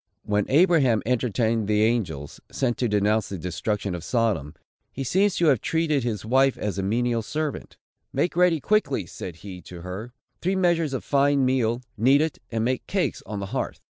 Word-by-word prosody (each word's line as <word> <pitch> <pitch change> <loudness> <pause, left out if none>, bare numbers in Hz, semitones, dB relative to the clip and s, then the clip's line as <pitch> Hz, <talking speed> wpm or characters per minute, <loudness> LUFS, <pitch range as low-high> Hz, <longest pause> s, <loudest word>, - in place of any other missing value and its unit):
When 105 -1 0
Abraham 140 - +4
entertained 115 -2 0
the 105 0 +3
angels, 90 - -1
sent 120 -3 -1
to 125 - +1
denounce 105 0 +1
the 100 - -4
destruction 100 +3 -3
of 85 -2 -5
Sodom, 100 - 0 0.4
he 135 - -5
seems 190 +9 +2
to 170 - +2
have 135 -8 +4
treated 160 -5 0
his 110 -4 -3
wife 135 +3 +3
as 100 -2 -3
a - - +1
menial 115 +4 0
servant: 150 +6 -4 0.3
"Make 175 - 0
ready 175 -2 +4
quickly," 145 - +1
said 85 0 -8
he 90 -3 -8
to 90 0 -10
her, 95 +7 -6 0.3
"three 185 +2 0
measures 170 -6 +1
of - - -4
fine 140 -1 +3
meal, 125 -2 +1 0.2
knead 135 +6 +5
it, 160 -1 -2
and 115 -1 0
make 130 +1 -1
cakes 195 -2 -1
on 105 -1 -4
the - - -3
hearth." - - -3
120 Hz, 185 wpm, -25 LUFS, 105-145 Hz, 0.4 s, knead